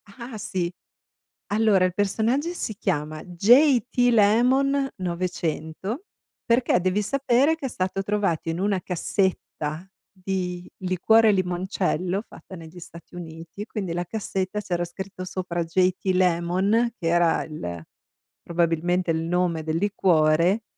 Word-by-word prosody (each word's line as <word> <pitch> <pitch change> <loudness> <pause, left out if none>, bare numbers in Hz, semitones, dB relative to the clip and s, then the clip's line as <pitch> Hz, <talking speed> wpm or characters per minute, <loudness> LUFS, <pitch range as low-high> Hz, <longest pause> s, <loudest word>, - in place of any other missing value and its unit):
Ah, 235 -2 -8
sì! 185 -4 -2 0.8
Allora 210 -4 +4
il 180 - -1
personaggio 225 - 0
si 225 -10 -4
chiama 155 -7 -2
J.T. 245 - +4
Lemon 260 +6 +3
900 180 - -3 0.4
perché 240 -5 +3
devi 185 +3 +1
sapere 275 +5 +2
che 290 -4 -4
è - - -6
stato 190 -2 -2
trovato 195 -6 -1
in 165 +2 -2
una 195 -1 0
cassetta 180 -2 -2 0.2
di 180 -2 -4
liquore 215 +5 +4
limoncello 185 0 -1
fatta 190 - -12
negli 165 +2 -11
Stati 170 0 -13
Uniti, 165 +3 -8
quindi 195 -6 -4
la 175 +1 -1
cassetta 195 0 -3
c'era 175 -4 -2
scritto 185 +2 -7
sopra 180 -2 -3
J.T. 185 +3 +1
Lemon, 185 +6 +2
che 165 - -2
era 170 0 +3
il 85 - -6 0.6
probabilmente 170 +1 0
il 160 0 0
nome 170 -1 0
del 160 +1 -1
liquore 175 0 +2
185 Hz, 125 wpm, -24 LUFS, 170-210 Hz, 0.8 s, Allora